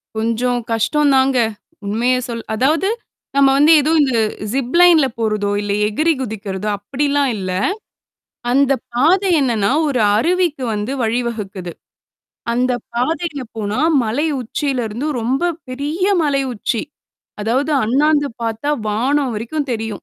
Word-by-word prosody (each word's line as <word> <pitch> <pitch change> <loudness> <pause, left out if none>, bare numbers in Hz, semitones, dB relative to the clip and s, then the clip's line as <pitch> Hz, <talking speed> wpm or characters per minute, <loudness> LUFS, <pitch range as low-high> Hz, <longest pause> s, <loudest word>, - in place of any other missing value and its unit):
கொஞ்சம் 230 +3 0
கஷ்டம் 285 +6 +2
தாங்க. 265 0 +3 0.5
உண்மைய 235 +5 +1
சொல் 230 -1 -5
அதாவது. 310 - +2 0.5
நம்ம 275 -1 +5
வந்து 295 +3 +5
ஏதோ 305 - 0
இந்த 265 -3 +1 0.4
ஜிப்லைன்ல 315 +3 +4
போறதோ, 215 -2 0
இல்ல 205 -1 -3 0.2
எகிரி 310 +10 +1
குதிக்கிறதோ! 205 -3 -4
அப்பிடிலாம் 280 +6 0
இல்ல. 185 -2 -4 1.0
அந்த 275 +1 +3 0.2
பாதை 355 +10 +3
என்னன்னா, 230 -6 +1 0.2
ஒரு 265 -4 0 0.2
அருவிக்கு 340 0 +1
வந்து 210 +4 -3
வழிவகுக்குது. 220 -6 -3 0.8
அந்த 250 +2 +1 0.2
பாதையில 305 +4 -2 0.2
போனா 210 +3 -2 0.2
மலை 260 +9 0
உச்சியில 255 +1 -2
இருந்து 235 +8 -4
ரொம்ப 270 +10 0 0.2
பெரிய 290 +8 -3 0.2
மலை 280 -2 +1
உச்சி. 225 0 -2 0.6
அதாவது 255 +8 0
அண்ணாந்து 290 +4 +2
பார்த்தா 230 +6 -2 0.2
வானம் 260 +5 0
வரைக்கும் 275 +7 -3
தெரியும். 225 -2 -4
255 Hz, 120 wpm, -18 LUFS, 220-290 Hz, 1.0 s, நம்ம